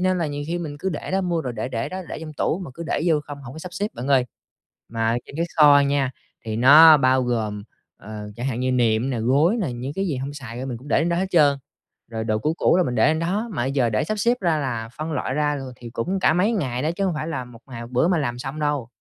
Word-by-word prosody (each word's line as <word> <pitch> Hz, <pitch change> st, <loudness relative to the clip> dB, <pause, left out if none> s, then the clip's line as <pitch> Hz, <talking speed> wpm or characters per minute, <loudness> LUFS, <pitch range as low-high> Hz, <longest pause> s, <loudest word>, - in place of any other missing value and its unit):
nên 185 Hz, 0 st, +1 dB
là 170 Hz, -, 0 dB
nhiều 145 Hz, -1 st, -4 dB
khi 170 Hz, +2 st, -2 dB
mình 155 Hz, -4 st, -5 dB
cứ 190 Hz, -, -2 dB
để 165 Hz, -, -5 dB
đó, 190 Hz, +1 st, +1 dB
mua 175 Hz, -3 st, -1 dB
rồi 125 Hz, -5 st, -4 dB
để 115 Hz, +1 st, -4 dB
để 115 Hz, -3 st, -3 dB
đó, 185 Hz, +1 st, -5 dB
để -, -, -5 dB
trong 160 Hz, -1 st, -7 dB
tủ, 155 Hz, -, -1 dB
mà -, -, -9 dB
cứ 170 Hz, -, -7 dB
để 160 Hz, -, -1 dB
vô 155 Hz, -3 st, +3 dB
không, 145 Hz, -1 st, -9 dB
hổng 130 Hz, -2 st, -9 dB
có 155 Hz, -, -9 dB
sắp 180 Hz, +2 st, -8 dB
xếp 200 Hz, +3 st, -1 dB
bạn 125 Hz, +3 st, -5 dB
ơi. 135 Hz, -3 st, +4 dB, 0.6 s
Mà 115 Hz, 0 st, 0 dB
trên 140 Hz, -, -10 dB
cái 170 Hz, +1 st, 0 dB
kho 145 Hz, -2 st, +7 dB
nha, 140 Hz, -2 st, +1 dB, 0.3 s
thì 110 Hz, -1 st, -3 dB
nó 150 Hz, +6 st, +9 dB
bao 130 Hz, -1 st, +3 dB
gồm, 110 Hz, -4 st, -2 dB, 0.3 s
ờ, 105 Hz, 0 st, -8 dB
chẳng 120 Hz, +3 st, -4 dB
hạn 125 Hz, -2 st, -2 dB
như 130 Hz, 0 st, 0 dB
nệm 120 Hz, 0 st, +2 dB
nè, 120 Hz, -3 st, -2 dB
gối 145 Hz, -, +3 dB
nè, 160 Hz, -11 st, -2 dB
những 125 Hz, +3 st, -5 dB
cái 195 Hz, +2 st, -1 dB
gì 150 Hz, -, -1 dB
hông 135 Hz, +2 st, -4 dB
xài 120 Hz, -4 st, -8 dB
á, 130 Hz, -, -4 dB
mình 125 Hz, -3 st, -4 dB
cũng 135 Hz, -, -13 dB
để -, -, +3 dB
lên 165 Hz, -, +1 dB
đó 170 Hz, -, 0 dB
hết 190 Hz, +2 st, 0 dB
trơn. 145 Hz, -5 st, +4 dB, 0.5 s
Rồi 110 Hz, -1 st, -4 dB
đồ 110 Hz, -1 st, 0 dB
cũ 155 Hz, +7 st, 0 dB
cũ -, -, +3 dB
là 185 Hz, -, +4 dB
mình 125 Hz, -6 st, -2 dB
để 110 Hz, -, +4 dB
lên 155 Hz, +1 st, +2 dB
đó, 195 Hz, +7 st, -1 dB
mà 120 Hz, -, -2 dB
bây 135 Hz, -, -1 dB
giờ 130 Hz, -4 st, +1 dB
để 110 Hz, -1 st, 0 dB
sắp 215 Hz, +7 st, -3 dB
xếp 235 Hz, +3 st, +3 dB
ra, 165 Hz, -4 st, +1 dB
là 115 Hz, -5 st, -3 dB
phân 155 Hz, +1 st, -4 dB
loại 130 Hz, -3 st, -2 dB
ra 150 Hz, 0 st, +1 dB
rồi 135 Hz, -2 st, -7 dB
thì 120 Hz, -1 st, -10 dB
cũng 180 Hz, +12 st, -2 dB
cả 170 Hz, -, +3 dB
mấy 185 Hz, +7 st, +2 dB
ngày 130 Hz, -, -2 dB
đó 155 Hz, -, 0 dB
chứ 195 Hz, +3 st, -2 dB
hông 185 Hz, -, 0 dB
phải 155 Hz, 0 st, -4 dB
là 145 Hz, -6 st, -3 dB
một 120 Hz, -2 st, -14 dB
ngày 120 Hz, -3 st, -8 dB
một 120 Hz, -, -8 dB
bữa 125 Hz, +6 st, +2 dB
mà 180 Hz, -1 st, +2 dB
làm 120 Hz, -5 st, -2 dB
xong 135 Hz, +4 st, -5 dB
đâu. 145 Hz, -5 st, -1 dB
140 Hz, 305 wpm, -23 LUFS, 120-165 Hz, 0.6 s, nó